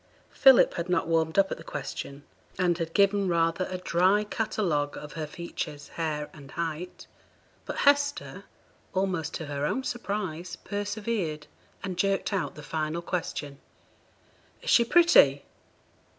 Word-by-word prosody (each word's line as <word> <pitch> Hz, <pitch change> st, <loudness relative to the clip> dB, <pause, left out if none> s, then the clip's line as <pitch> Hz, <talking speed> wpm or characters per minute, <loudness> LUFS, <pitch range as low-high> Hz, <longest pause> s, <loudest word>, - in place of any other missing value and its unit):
Philip 265 Hz, -2 st, +6 dB
had 170 Hz, +1 st, -4 dB
not 180 Hz, -, +1 dB
warmed 160 Hz, 0 st, +1 dB
up 195 Hz, -1 st, +4 dB
at -, -, -3 dB
the -, -, -10 dB
question, 140 Hz, +1 st, -6 dB, 0.3 s
and 180 Hz, -2 st, +2 dB
had 165 Hz, 0 st, -4 dB
given 200 Hz, 0 st, +3 dB
rather 170 Hz, +1 st, +1 dB
a 185 Hz, -, -3 dB
dry 185 Hz, +3 st, +3 dB
catalogue 195 Hz, -9 st, -1 dB
of 150 Hz, -, -8 dB
her 155 Hz, -2 st, -4 dB
features, 150 Hz, -2 st, -6 dB
hair, 150 Hz, -3 st, -3 dB
and 140 Hz, -3 st, -13 dB
height, 170 Hz, +3 st, -5 dB, 0.6 s
but -, -, -4 dB
Hester, 285 Hz, 0 st, +2 dB, 0.5 s
almost 185 Hz, -4 st, -1 dB
to 160 Hz, -, -4 dB
her 145 Hz, -1 st, -4 dB
own 260 Hz, -, 0 dB
surprise, 190 Hz, -8 st, -4 dB
persevered, 205 Hz, -6 st, -3 dB, 0.4 s
and 185 Hz, -2 st, -4 dB
jerked 195 Hz, +1 st, +1 dB
out 190 Hz, -, -1 dB
the 150 Hz, -, -10 dB
final 155 Hz, +2 st, -3 dB
question. 145 Hz, -6 st, -4 dB, 1.0 s
'Is -, -, 0 dB
she 235 Hz, -, +7 dB
pretty?' 230 Hz, -, +5 dB
175 Hz, 140 wpm, -28 LUFS, 155-200 Hz, 1.0 s, she